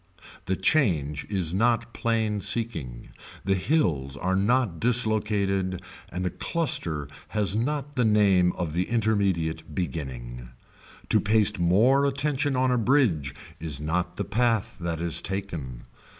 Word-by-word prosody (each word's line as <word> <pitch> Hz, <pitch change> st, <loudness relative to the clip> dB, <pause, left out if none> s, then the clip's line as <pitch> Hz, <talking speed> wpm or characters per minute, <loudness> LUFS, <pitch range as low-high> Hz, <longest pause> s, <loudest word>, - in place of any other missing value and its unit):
The 95 Hz, -, 0 dB
change 80 Hz, -, +1 dB
is 90 Hz, -5 st, 0 dB
not 115 Hz, +3 st, +1 dB
plain 110 Hz, -3 st, 0 dB
seeking, 80 Hz, -, -2 dB, 0.4 s
the 95 Hz, -, +2 dB
hills 85 Hz, -, 0 dB
are 95 Hz, +4 st, 0 dB
not 105 Hz, -3 st, +1 dB
dislocated 105 Hz, -5 st, +1 dB, 0.3 s
and 90 Hz, +1 st, -4 dB
the 90 Hz, -, -1 dB
cluster 85 Hz, -, -1 dB, 0.2 s
has 105 Hz, -3 st, 0 dB
not 145 Hz, +4 st, -2 dB
the 125 Hz, -, +2 dB
name 100 Hz, -5 st, +4 dB
of 85 Hz, -4 st, -3 dB
the 90 Hz, +2 st, -1 dB
intermediate 95 Hz, -9 st, 0 dB
beginning. 65 Hz, -7 st, -5 dB, 0.6 s
To -, -, +4 dB
paste 105 Hz, -3 st, +2 dB
more 115 Hz, +11 st, +4 dB
attention 140 Hz, 0 st, 0 dB
on 130 Hz, 0 st, +2 dB
a 125 Hz, -, +2 dB
bridge 110 Hz, -, +2 dB, 0.2 s
is 75 Hz, -4 st, -4 dB
not 80 Hz, +4 st, -2 dB
the 100 Hz, -, -2 dB
path 115 Hz, +1 st, 0 dB
that 85 Hz, -2 st, -3 dB
is 85 Hz, -1 st, 0 dB
taken. 85 Hz, -11 st, -5 dB
95 Hz, 135 wpm, -26 LUFS, 80-115 Hz, 0.6 s, name